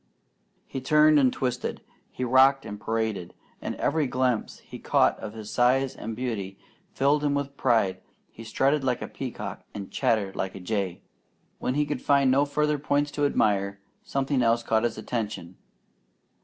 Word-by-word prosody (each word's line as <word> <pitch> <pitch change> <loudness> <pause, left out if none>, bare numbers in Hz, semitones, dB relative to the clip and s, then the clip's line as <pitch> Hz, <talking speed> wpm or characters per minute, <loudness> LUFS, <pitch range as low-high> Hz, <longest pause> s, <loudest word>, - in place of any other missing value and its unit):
He 135 - -6
turned 150 +2 +5
and 130 -2 +4
twisted. 125 -1 -3 0.3
He 130 - -5
rocked 130 +2 +5
and 105 -1 -7
paraded, 110 -5 -2 0.3
and - - -4
every 150 -1 0
glimpse 125 -2 0
he - - -11
caught - - +3
of 105 - -7
his 110 -1 -8
size 130 +2 +2
and 110 0 -6
beauty 105 -6 -4 0.3
filled 145 +2 +2
him 145 -1 +1
with 140 0 -3
pride. 110 -9 +1 0.3
He 115 - -11
strutted 135 +5 +1
like 125 -2 0
a - - -5
peacock - - -6
and 100 -2 -7
chattered 100 -4 0
like 95 - -3
a - - -7
jay. 95 -1 -3 0.6
When 130 - -1
he 150 0 +2
could 145 -3 -3
find 140 -2 +3
no 140 +2 +4
further 150 +1 0
points 145 0 0
to 145 0 +1
admire, 100 -6 +1 0.2
something 135 -1 -1
else 115 0 +2
caught 110 0 +1
his 120 - -2
attention. 105 -6 -4
125 Hz, 170 wpm, -26 LUFS, 105-140 Hz, 0.6 s, turned